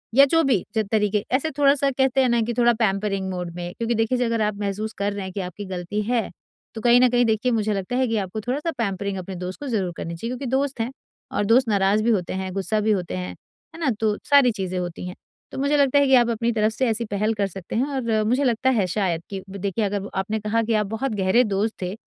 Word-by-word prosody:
या 275 +1 +8
जो 330 +4 +3
भी 260 -9 +2
जो 220 - +2
तरीके 210 -1 +1
ऐसे 315 +4 0
थोड़ा-सा 280 -1 +4
कहते 265 0 +2
हैं 255 - +3
ना 235 -1 +2
कि 235 +2 -1
थोड़ा 240 0 +5
पैम्परिंग 195 -2 0
मोड 180 -2 -4
में 175 0 -5
क्योंकि 235 0 -1
देखिए 245 +3 +1
अगर 230 -1 0
आप 210 -1 0
महसूस 210 +2 -3
कर 200 +1 -1
रहे 200 -1 -4
हैं 190 - -6
कि - - -4
आपकी 180 +3 -6
गलती 185 +2 -3
है 235 -2 +1 0.5
तो 220 - -5
कहीं 240 +1 +6
न 255 - +6
कहीं 245 0 +3
देखिए 225 +3 +1
मुझे 215 -2 +1
लगता 195 +5 -3
है 260 -1 +2
कि 225 -1 0
आपको 200 +2 -3
थोड़ा-सा 285 +8 -2
पैम्परिंग 200 -3 -2
अपने 185 +1 -6
दोस्त 180 +1 -6
को 290 - -6
ज़रूर 195 -7 -1
करनी 170 +1 -5
चाहिए 230 +8 -5
क्योंकि 255 +2 -5
दोस्त 270 -1 0
हैं 240 +3 -2 0.5
और 205 - +1
दोस्त 235 +3 +4
नाराज़ 200 +1 +2
भी 235 - +2
होते 185 -5 0
हैं, 190 0 -3
गुस्सा 200 +3 0
भी 215 +1 +2
होते 180 - -1
हैं, 90 0 -4 0.5
है 330 - -10
ना 310 - +1
तो 215 -2 +1
सारी 280 -4 +6
चीज़ें 190 -3 -4
होती 175 0 -5
हैं। 180 - -7 0.4
तो - - -7
मुझे 280 +2 +2
लगता 285 0 +4
है 280 - +3
कि 265 - +3
आप 240 -1 +4
अपनी 235 +1 0
तरफ 215 -1 +1
से 255 +3 0
ऐसी 230 +1 0
पहल 210 +2 0
कर 200 -2 0
सकते 190 +1 -7
हैं 245 +4 +2
और 225 -4 0
मुझे 255 +5 +2
लगता 255 +1 +2
है 205 -5 +2
शायद 175 -3 -1
कि 195 - -4
ब 200 - -7
देखिए 205 +2 -1
अगर 200 0 -2
आपने 215 +3 -2
कहा 215 +2 0
कि 225 0 -1
आप 210 -1 +2
बहुत 225 +4 -2
गहरे 195 +5 +3
दोस्त 210 +1 0
थे, 180 +1 -3
215 Hz, 260 wpm, -23 LUFS, 195-245 Hz, 0.5 s, या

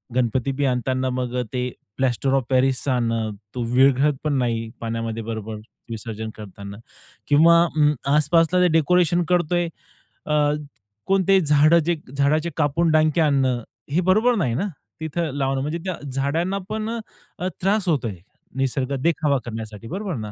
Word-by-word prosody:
गणपतीबी 130 +3 0
आणताना 130 +1 0
मग 125 0 -2
ते 125 0 -1 0.3
प्लास्टर 130 0 0
ऑफ 135 -2 +2
पॅरिसचा 130 +1 +2
आणणं. 115 -2 0 0.3
तो 125 - -2
विरघळत 135 +3 +4
पण 150 -1 0
नाही 115 -2 -1
पाण्यामध्ये 115 0 -3
बरोबर, 110 -1 -5 0.3
विसर्जन 110 -1 -5
करतांना. 100 -1 -9 0.5
किंवा 165 +3 +6
अ, 150 -3 +2 0.2
आसपासला 165 +4 +3
ते 180 - +5
डेकोरेशन 175 +2 +3
करतो 175 -1 +2
आहे, 175 -1 0 0.6
अ, 150 -1 +2 0.5
कोणतेही 195 0 +3
झाडं 150 +2 +5
जे 175 0 +1 0.2
झाडाचे 155 +4 +2
कापून 160 +2 +2
डांके 155 +1 +3
आणणं, 135 -5 +2 0.3
हे 165 +5 +2
बरोबर 215 +7 +3
नाही 155 - 0
ना, 195 +11 -1 0.3
तिथं 160 0 -2
लावणं. 135 -1 0
म्हणजे 150 +4 -2
त्या 185 -2 -2 0.2
झाडांना 160 +8 -1
पण 215 0 -3 0.5
अ, 180 - -1
त्रास 195 +1 +1
होतोय, 125 - 0 0.4
निसर्ग 135 0 -1
देखावा 150 -4 +2
करण्यासाठी. 110 -1 -7
बरोबर 190 - -4
ना? 105 -2 -5
140 Hz, 145 wpm, -22 LUFS, 125-170 Hz, 0.6 s, किंवा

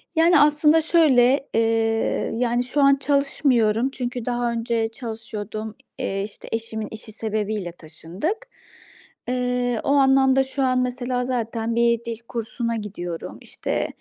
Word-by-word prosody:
Yani, 325 -1 +5
aslında 300 +2 +5
şöyle, 275 -5 +4
eee, 225 - +3 0.7
yani, 240 0 +1
şu 280 +4 -1
an 275 0 +6
çalışmıyorum 270 -4 +1
çünkü 245 -2 -5
daha 240 -1 0
önce 230 -1 -1
çalışıyordum. 220 -2 -6 0.2
Eee, 195 0 -2
işte, 205 - -10
eşimin 220 -1 -3
işi 220 0 -10
sebebiyle 215 -4 -3
taşındık. 175 - -5 0.9
Eee, 250 -1 0
o - - -2
anlamda 270 -1 +4
şu 265 +1 -3
an 255 -1 +2
mesela 250 0 -2
zaten 230 -2 -2
bir 235 0 +2
dil 230 -1 -4
kursuna 230 0 -3
gidiyorum, 175 -6 -6
işte, - - -3
240 Hz, 130 wpm, -23 LUFS, 220-265 Hz, 0.9 s, an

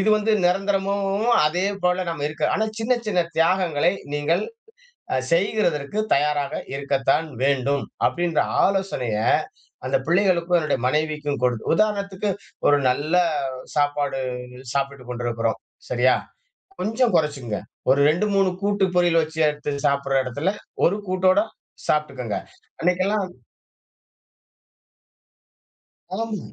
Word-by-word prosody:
இது 200 - +1
வந்து 215 +1 +1
நிரந்தரமும், 195 +2 0 0.2
அதே 175 +5 0 0.2
போல 180 +1 +2
நம்ம 145 -3 -4
இருக்க 155 +1 -8
ஆனா 220 - +1
சின்ன 225 +3 +1
சின்ன 195 -4 0 0.2
தியாகங்களை 170 -2 +3 0.2
நீங்கள் 155 +6 +1 0.7
அ - - +3 0.2
செய்கிறதற்கு 175 -2 +1 0.2
தயாராக 145 0 0 0.2
இருக்கத்தான் 140 +2 +1 0.2
வேண்டும். 140 0 +1 0.2
அப்படின்ற 175 -2 +1 0.2
ஆலோசனைய 190 - 0 0.7
அந்த 130 - +2
பிள்ளைகளுக்கும் 175 -1 +3
என்னுடைய 155 -5 0
மனைவிக்கும் 150 0 -1
கொடுத் 125 -3 0
உதாரணத்துக்கு 200 -1 0 0.4
ஒரு 145 - +5
நல்ல 145 +6 0 0.6
சாப்பாடு 145 -2 0 0.5
சாப்பிட்டு 140 -1 -2
கொண்டிருக்கிறோம். 120 -2 -1 0.3
சரியா? 125 +1 +3 0.7
கொஞ்சம் 225 +1 +1
கொறச்சுக்குங்க. 145 -9 0 0.3
ஒரு 140 - +4
2,3 195 +2 +2
கூட்டு, 200 -1 +2
பொரியல் 175 -2 +4
வச்சு 160 0 -5
எடுத்து 150 0 -4 0.2
சாப்பிட்ற 140 -1 +1
எடத்துல, 145 +9 -1 0.3
ஒரு 200 +5 +2
கூட்டோட 185 +1 +3 0.5
சாப்பி்ட்டுக்கங்க. 135 -7 -1 0.4
அன்னைக்கெல்லாம் 185 +3 +1 2.9
ஆம். 225 -1 -3
165 Hz, 105 wpm, -23 LUFS, 140-195 Hz, 2.9 s, ஒரு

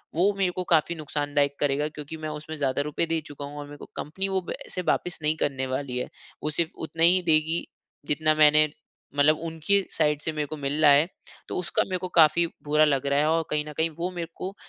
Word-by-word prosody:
वो 190 +5 +3
मेरे 190 -2 +1
को 185 - -2
काफ़ी 165 +1 +3
नुकसानदायक 145 -2 -1
करेगा 145 +1 +1
क्योंकि 150 +1 -8
मैं 155 0 -5
उसमें 155 +1 -6
ज़्यादा 140 -1 0
रुपए 150 +3 -1
दे 165 0 0
चूका 145 -1 -7
हूँ 145 +1 -9
और 145 - -6
मेरे 145 0 -10
को - - -10
कंपनी 190 +7 -3
वो 190 -1 0
पैसे 185 - -5
वापस 180 -2 -1
नहीं 155 +1 +3
करने 135 -3 -1
वाली 130 -1 -3
है। 125 - -3 0.3
वो 150 - 0
सिर्फ़ 160 +2 -1 0.2
उतना 165 +2 -2
ही 180 +2 +6
देगी, 160 +1 +2 0.4
जितना 155 +1 +2
मैंने, 155 0 +6 0.5
मतलब 150 +2 +4
उनकी 165 +5 +2 0.2
साइड 150 -2 +2
से 160 - -2
मेरे 150 -1 -1
को 155 - -6
मिल 145 +2 -2
रहा 145 - +8
है, 145 +4 +5 0.4
तो - - -3
उसका 180 - 0
मेरे 185 -1 -2
को 185 - -4
काफ़ी 155 +2 +5 0.2
बुरा 150 +1 +4
लग 140 -2 +1
रहा 140 +1 +2
है 150 - +2
और 165 0 +1
कहीं 150 0 0
न - - -8
कहीं 160 +1 +2
वो 180 +2 -1
मेरे 175 -2 -5
को, 190 +2 -6
155 Hz, 235 wpm, -26 LUFS, 145-165 Hz, 0.5 s, रहा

